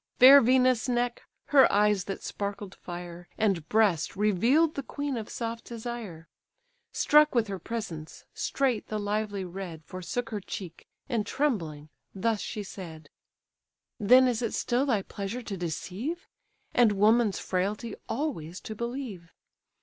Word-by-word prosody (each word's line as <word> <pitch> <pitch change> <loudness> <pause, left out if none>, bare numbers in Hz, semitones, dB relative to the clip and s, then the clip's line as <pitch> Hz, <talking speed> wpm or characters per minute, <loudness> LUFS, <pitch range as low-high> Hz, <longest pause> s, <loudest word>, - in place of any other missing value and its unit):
Fair 275 +3 +10
Venus' 255 0 +3
neck, 240 0 0 0.3
her 280 -2 +6
eyes 205 -2 +3
that 195 - -5
sparkled 200 -1 -5
fire, 175 0 -9
And 190 -7 0
breast, 205 -8 +2
reveal'd 230 - +3
the 280 - -3
queen 285 0 -4
of 225 -3 -5
soft 230 -1 -4
desire. 225 -8 -7 0.6
Struck 300 -1 +4
with 230 -2 +3
her 195 -1 -4
presence, 170 -7 -6
straight 260 -6 -1
the 215 - -3
lively 205 -1 -2
red 175 -3 -7
Forsook 230 - -4
her 210 - -2
cheek; 180 -3 -8 0.2
and 235 -6 0
trembling, 165 - -2 0.3
thus 215 +2 0
she 210 - -4
said: 160 -6 -10 0.9
"Then 250 +5 +6
is 245 -2 0
it 230 - -2
still 255 +3 0
thy 215 -7 +1
pleasure 205 +7 -5
to 205 - -5
deceive? 190 - -4 0.5
And 235 -4 +5
woman's 215 +1 +3
frailty 205 +5 -2 0.2
always 185 - -3
to 220 - -6
believe! 235 -7 -5
215 Hz, 140 wpm, -28 LUFS, 185-245 Hz, 0.9 s, Fair